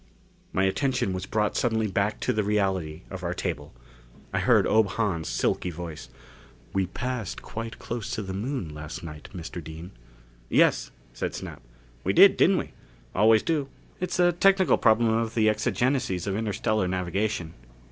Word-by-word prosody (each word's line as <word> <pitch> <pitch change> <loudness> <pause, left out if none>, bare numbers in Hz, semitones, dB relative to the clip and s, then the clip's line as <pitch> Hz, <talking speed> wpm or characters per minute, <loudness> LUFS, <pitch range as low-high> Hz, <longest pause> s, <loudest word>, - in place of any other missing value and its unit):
My 95 - +1
attention 125 +1 +1
was 95 - -4
brought 105 -1 0
suddenly 110 -2 +1
back 100 0 0
to - - +1
the 110 - +1
reality 95 -6 -1
of 95 -1 -6
our 90 0 -2
table. 80 -6 -4 0.6
I - - +1
heard - - +4
Ob 110 -1 +4
Hahn's 95 - -1
silky - - 0
voice. 85 -2 -7 0.6
"We 95 -1 +1
passed 125 0 -4
quite 115 0 -6
close 120 -1 -5
to 110 - -3
the 95 -1 -5
Moon 100 - -3
last 75 +2 -7
night, 75 -2 -9
Mr. 85 -2 -7
Dean." 80 +3 -9 0.6
"Yes," - - +3 0.2
said - - -3
Snap. - - -7 0.4
"We - - +1
did, - - +8
didn't - - +4
we? - - -3 0.4
Always 110 +2 +5
do 150 -4 0 0.3
it's 180 - -2
a 175 -1 +5
technical 190 +2 +4
problem 115 0 +4
of 115 0 0
the 110 -2 +3
exigencies 120 -2 +1
of 100 -1 -1
interstellar 110 -2 0
navigation. 90 -1 -2
105 Hz, 160 wpm, -26 LUFS, 90-115 Hz, 0.6 s, did